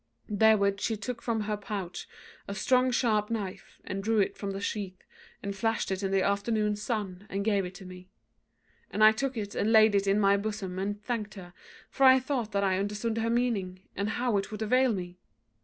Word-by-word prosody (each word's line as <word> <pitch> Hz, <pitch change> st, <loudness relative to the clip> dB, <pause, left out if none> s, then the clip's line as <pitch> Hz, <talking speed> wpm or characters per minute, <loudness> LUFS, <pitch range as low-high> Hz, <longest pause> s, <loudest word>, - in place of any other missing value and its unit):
Therewith 205 Hz, -1 st, +3 dB
she 220 Hz, +1 st, -1 dB
took 235 Hz, +3 st, -5 dB
from 230 Hz, -2 st, -1 dB
her 210 Hz, 0 st, -1 dB
pouch 195 Hz, -3 st, -6 dB, 0.4 s
a 200 Hz, -, -5 dB
strong 255 Hz, +6 st, +3 dB
sharp 220 Hz, -4 st, +1 dB
knife, 205 Hz, -5 st, -5 dB
and 195 Hz, +1 st, -5 dB
drew 225 Hz, +1 st, +1 dB
it 195 Hz, -, +1 dB
from 200 Hz, -, -5 dB
the 195 Hz, 0 st, -4 dB
sheath, 200 Hz, -2 st, -4 dB, 0.4 s
and 200 Hz, 0 st, -4 dB
flashed 225 Hz, +1 st, -1 dB
it 190 Hz, 0 st, -2 dB
in 195 Hz, -, -1 dB
the 195 Hz, -1 st, +2 dB
afternoon 210 Hz, +1 st, +1 dB
sun, 205 Hz, -3 st, -4 dB
and 200 Hz, +1 st, -3 dB
gave 200 Hz, -3 st, +2 dB
it 180 Hz, +1 st, -8 dB
to 190 Hz, -, -11 dB
me; 180 Hz, 0 st, -11 dB, 0.8 s
and 215 Hz, -, +1 dB
I 215 Hz, -, +9 dB
took 260 Hz, +3 st, -3 dB
it 205 Hz, -1 st, -4 dB
and 215 Hz, -, 0 dB
laid 220 Hz, -1 st, +6 dB
it 200 Hz, 0 st, +2 dB
in 195 Hz, +1 st, +3 dB
my 200 Hz, -1 st, +4 dB
bosom 200 Hz, -3 st, -4 dB
and 205 Hz, +2 st, -2 dB
thanked 220 Hz, -4 st, -3 dB
her; 180 Hz, -3 st, -10 dB, 0.3 s
for 275 Hz, -, -2 dB
I 260 Hz, 0 st, +8 dB
thought 255 Hz, -4 st, -2 dB
that 200 Hz, 0 st, 0 dB
I 190 Hz, -1 st, +2 dB
understood 210 Hz, +3 st, -2 dB
her 225 Hz, +1 st, 0 dB
meaning, 215 Hz, -7 st, -1 dB
and 200 Hz, +2 st, -1 dB
how 240 Hz, -1 st, 0 dB
it 195 Hz, -, -2 dB
would 215 Hz, 0 st, -4 dB
avail 255 Hz, +3 st, +3 dB
me. 180 Hz, -3 st, -5 dB
205 Hz, 210 wpm, -29 LUFS, 195-225 Hz, 0.8 s, I